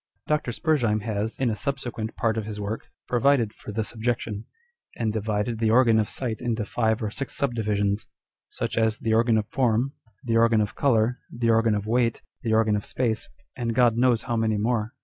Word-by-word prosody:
Dr. 150 -5 0
Spurz 155 +3 +1
heim 110 -2 +1
has, 110 0 -2
in 130 -3 +1
a - - -1
subsequent 120 -3 -3
part 115 -3 +1
of 110 -2 -2
his 105 -1 -6
work, 105 +2 -4 0.2
provided 125 -3 +2
for 105 - -9
this 110 +2 -3
objection, 115 -2 -2 0.5
and 110 -2 -1
divided 110 +1 -1
the 110 -1 +2
Organ 115 -1 +5
of 105 - 0
Sight 120 -4 -3
into 115 -3 -1
five 110 0 0
or 105 - -2
six 135 +4 -4
subdivisions; 105 -6 0 0.4
such - - -2
as 110 0 +2
the 110 - -1
Organ 115 0 +4
of 105 - 0
Form, 125 +1 +1 0.3
the 115 -3 +1
Organ 115 -1 +4
of 105 -1 0
Colour, 125 -3 +2
the 120 -1 +1
Organ 115 -1 +3
of 105 0 -3
Weight, 115 +1 +1 0.2
the 115 - -2
Organ 110 -1 +3
of 105 - -2
Space, 115 -4 -1 0.3
and 115 -2 -2
God 120 -2 +4
knows 120 -1 +3
how 120 - -2
many 110 -1 +1
more. 110 +2 -1
115 Hz, 200 wpm, -25 LUFS, 110-120 Hz, 0.5 s, Organ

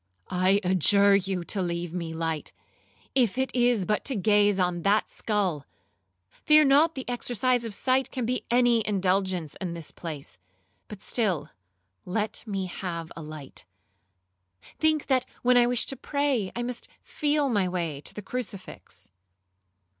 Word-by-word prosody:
'I 185 +2 +3
adjure 200 +3 +5
you 190 -2 -1
to 195 +3 0
leave 170 -1 -3
me 170 -2 -4
light, 160 -1 -3 0.6
if 245 -4 +2
it 265 0 -1
is 240 -5 +3
but 210 +2 0
to 270 - +1
gaze 205 -1 +3
on 180 -1 0
that 200 +4 +2
skull; 190 -10 -1 0.6
fear 305 - +4
not 295 +4 +4
the 265 - -6
exercise 245 0 0
of 215 -3 -4
sight 260 +3 +1
can 255 -3 -3
be 250 +2 -1
any 240 -1 +4
indulgence 185 -5 0
in 175 -3 -3
this 165 -2 -8
place; 145 - -8 0.5
but 210 -2 -10
still 185 - 0 0.5
let 210 +4 -2
me 195 -2 -2
have 170 -2 -5
a 165 - -7
light; 150 -3 -9 1.2
think 310 -2 +2
that 260 -2 +1 0.2
when 250 0 +4
I 240 -1 +6
wish 245 -1 +1
to 270 - -3
pray, 270 -6 -1
I 240 - -2
must 245 0 -4 0.2
feel 295 -1 0
my 205 -7 +1
way 165 -6 -3
to - - -7
that 210 - -7
crucifix.' 205 - -6
205 Hz, 155 wpm, -27 LUFS, 180-245 Hz, 1.2 s, I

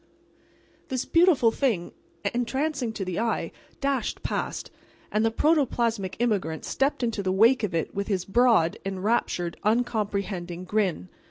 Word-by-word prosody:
This 255 -1 -2
beautiful 330 -9 +4
thing, 225 -10 0 0.4
entrancing 260 +1 -1
to 195 - -4
the 180 0 -3
eye, 230 0 -1 0.3
dashed 275 -4 -1
past, - - -3 0.4
and 215 +1 +1
the 225 - +3
protoplasmic 235 - +1
immigrant 200 -9 -1
stepped 270 -1 0
into 230 -3 -1
the 190 -1 0
wake 230 +7 +5
of 200 -6 -2
it 165 - -1
with 200 0 -3
his 190 -4 -1
broad, 225 -6 +3
enraptured, 190 -3 -1
uncomprehending 200 -6 -1
grin. 185 - -1
220 Hz, 135 wpm, -26 LUFS, 190-245 Hz, 0.4 s, wake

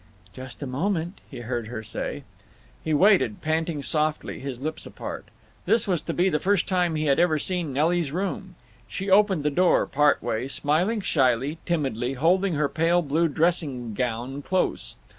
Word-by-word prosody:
"Just 130 +4 -8
a - - -3
moment," 170 +6 -2
he - - -8
heard 120 -1 -3
her 110 -1 -6
say. - - -5 0.6
He 160 - -2
waited, 150 - +4
panting 160 -1 -1
softly, 155 +1 -1
his 130 -3 -6
lips 155 +3 -4
apart. - - -7 0.4
This 225 -2 +3
was 180 -5 +1
to - - -4
be 180 +2 +3
the 150 -5 +1
first 200 +5 +1
time 180 -4 +1
he 155 0 -1
had 140 +1 +3
ever 170 -3 +3
seen 175 -1 -2
Nelly's 160 +2 +1
room. 190 +1 -4 0.3
She 195 +1 -4
opened 195 -5 +4
the 150 - +1
door 180 +5 +3
part 145 +1 +2
way, 115 +4 -2
smiling 170 +11 0
shyly, 135 -1 +1
timidly, 135 -7 -1
holding 180 +7 +2
her 150 -1 +1
pale 170 +3 +2
blue 160 +3 +1
dressing 145 -7 0
gown 125 +4 -3
close. 145 - -1
155 Hz, 170 wpm, -25 LUFS, 135-175 Hz, 0.6 s, waited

